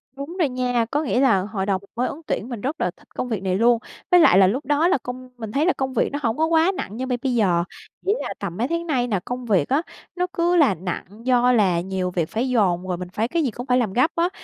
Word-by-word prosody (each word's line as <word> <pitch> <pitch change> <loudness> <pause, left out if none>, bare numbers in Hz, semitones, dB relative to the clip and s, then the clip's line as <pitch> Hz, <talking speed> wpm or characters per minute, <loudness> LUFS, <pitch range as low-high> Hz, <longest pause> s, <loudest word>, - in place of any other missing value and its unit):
Đúng 285 +7 -7
rồi 310 -6 +3
nha. 250 -2 0
Có 295 +2 0
nghĩa 255 - 0
là 260 -8 +4
hồi 195 0 -3
đầu 195 -1 +1
mình 200 - -21
mới 245 +2 0
ứng 305 - -7
tuyển 235 - -2
mình 230 -5 -5
rất 290 +4 -3
là 180 - +1
thích - - -23
công 250 - -3
việc 205 -4 -3
này 185 -1 0
luôn. 230 +2 +4 0.3
Với 360 - +7
lại 255 - +6
là 190 - +7
lúc 255 +10 -1
đó 295 +3 +2
là 360 - +3
công 255 0 -8
mình 220 -3 -6
thấy 285 +7 +1
là 365 - +3
công 265 -1 -3
việc - - +1
nó 285 - -3
hổng 230 -1 0
có 320 - +3
quá 325 +2 +3
nặng 210 - -5
như 260 - -2
bây 250 -1 -1
bây 255 -2 0
giờ, 180 -6 +2 0.4
chỉ 400 - +3
là - - -4
tầm 175 - -5
mấy 240 +4 0
tháng 335 +1 -2
nay 250 -5 +1
nè, 205 -5 0
công 250 0 -5
việc 195 -10 +2
á, 280 +4 +2 0.3
nó 360 0 0
cứ 350 -2 +2
là 285 - +4
nặng 180 +1 -5 0.2
do 250 -1 +4
là 190 -8 +3
nhiều 185 -1 -3
việc 170 -3 -1
phải 245 +4 -1
dồn 185 -6 +1
rồi 180 - -2
mình 180 0 -7
phải 220 +2 0
cái 330 +4 0
gì 255 - 0
cũng 245 +3 -7
phải 250 -1 +2
làm 220 -6 0
gấp 255 +6 +3
á, 340 +2 +2
245 Hz, 295 wpm, -22 LUFS, 200-285 Hz, 0.4 s, Với